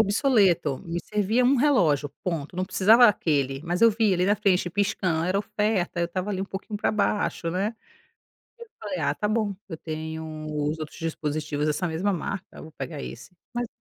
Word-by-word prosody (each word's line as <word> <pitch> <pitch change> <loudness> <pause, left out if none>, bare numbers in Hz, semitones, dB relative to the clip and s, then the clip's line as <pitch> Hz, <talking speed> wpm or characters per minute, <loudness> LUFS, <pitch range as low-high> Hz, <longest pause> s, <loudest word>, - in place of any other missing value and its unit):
obsoleto, 200 - +3
me 170 +1 -2
servia 210 +4 +1
um 265 +2 +4
relógio, 175 - +3 0.2
ponto. 165 -2 -3
Não 185 - 0
precisava 220 +6 +5
aquele, 140 -8 +1
mas 175 +3 -1
eu 230 - +8
vi 220 0 +2
ele 180 0 +2
na 200 +2 +4
frente 190 -4 +1
piscando, 185 -4 0
era 185 +2 +1
oferta, 210 -4 -1
eu 170 - +2
estava 185 +3 -3
ali 190 -2 -2
um - - -1
pouquinho 205 +2 -6
para - - +1
baixo, 205 -5 0
né. 195 +6 -1 0.9
Aí 470 - -9
eu - - -26
falei: 200 -4 -4
"Ah, 140 -1 +1
tá 210 - -2
bom, 215 -1 0 0.2
eu 160 - -5
tenho 160 -1 -6
os 150 +1 -2
outros 155 -1 -7
dispositivos 155 -2 -2
dessa 155 +4 0
mesma 170 +5 0
marca, 195 +1 -4
eu - - -9
vou 160 - -11
pegar 150 -1 -6
esse", - - -9 0.2
mas 240 0 -2
185 Hz, 195 wpm, -26 LUFS, 160-210 Hz, 0.9 s, eu